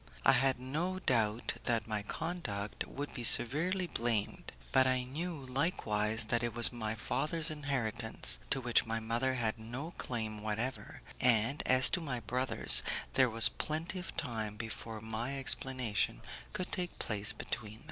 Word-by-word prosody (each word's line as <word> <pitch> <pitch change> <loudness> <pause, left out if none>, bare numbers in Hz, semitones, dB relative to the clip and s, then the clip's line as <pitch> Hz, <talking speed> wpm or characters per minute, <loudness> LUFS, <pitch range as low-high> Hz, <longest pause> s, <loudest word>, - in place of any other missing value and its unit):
I - - +7
had 135 -1 +2
no 160 +9 -3
doubt 115 - -1
that 115 -2 -1
my 105 -2 -3
conduct 110 - -5
would 145 +2 -7
be 120 - -6
severely 155 +12 +5
blamed, 115 -9 -3 0.2
but 130 -1 +4
I 130 -1 +1
knew 160 +6 -6
likewise 115 - +2
that 120 +1 -1
it 120 -1 -4
was 120 -1 +6
my 110 -2 -4
father's 155 +8 -1
inheritance, 125 -7 +1
to 135 - 0
which 120 -2 +1
my 115 0 -2
mother 120 +4 -2
had 115 -2 -2
no 125 +9 -7
claim 110 -3 -5
whatever, 110 +5 -5 0.2
and, 120 +3 +2
as 130 0 +7
to 175 - -1
my 135 -6 -4
brothers, 125 +4 +3 0.3
there 130 -2 +3
was 115 0 +8
plenty 165 +4 -4
of 180 - -9
time 110 -3 -4
before 115 0 -7
any 115 +5 -4
explanation 130 - -1 0.3
could 185 - -5
take 180 -3 -4
place 105 -1 +5
between 110 0 -6
us. - - -16
120 Hz, 155 wpm, -32 LUFS, 110-140 Hz, 0.3 s, was